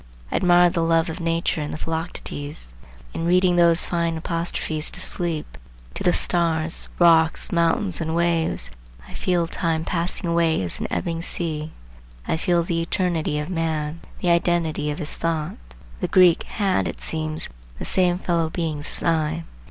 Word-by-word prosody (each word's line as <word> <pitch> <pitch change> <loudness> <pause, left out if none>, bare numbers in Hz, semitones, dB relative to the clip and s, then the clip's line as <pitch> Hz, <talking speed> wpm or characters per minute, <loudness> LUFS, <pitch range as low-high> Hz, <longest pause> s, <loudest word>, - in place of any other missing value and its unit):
I - - +1
admire 175 -1 +5
the 170 - 0
love 165 +1 +2
of 165 - -7
nature 165 -1 0
in 150 - -3
the - - -5
Philoctetes. 155 - -4 0.4
In - - -3
reading 180 0 +4
those 170 -1 +4
fine 170 -1 -1
apostrophes 165 -1 -1
to - - -8
sleep, 165 -4 -3 0.3
to - - -6
the 175 - +4
stars, 165 -2 +2
rocks, 165 -2 +4
mountains 170 +2 +1
and 160 0 -2
waves, 165 - +1 0.4
I - - -12
feel 175 -2 0
time 165 -1 -1
passing 175 +1 -2
away 170 -1 +2
as 85 - -1
an - - -2
ebbing 165 -2 -2
sea. 160 -3 -1 0.6
I - - +1
feel 170 +1 +1
the 165 0 -1
eternity 165 -3 -1
of 150 +4 -3
man, 160 -2 -2 0.2
the 175 - +2
identity 170 -3 +1
of 145 - -3
his 155 -3 -4
thought. 160 -2 -2 0.4
The - - -1
Greek 180 -3 +5
had 195 -3 0
it - - -6
seems 155 -1 -2 0.3
the - - -6
same 180 -2 +2
fellow 170 -3 0
beings 160 -3 -3
as - - -7
I. 160 -1 0
165 Hz, 165 wpm, -23 LUFS, 160-175 Hz, 0.6 s, admire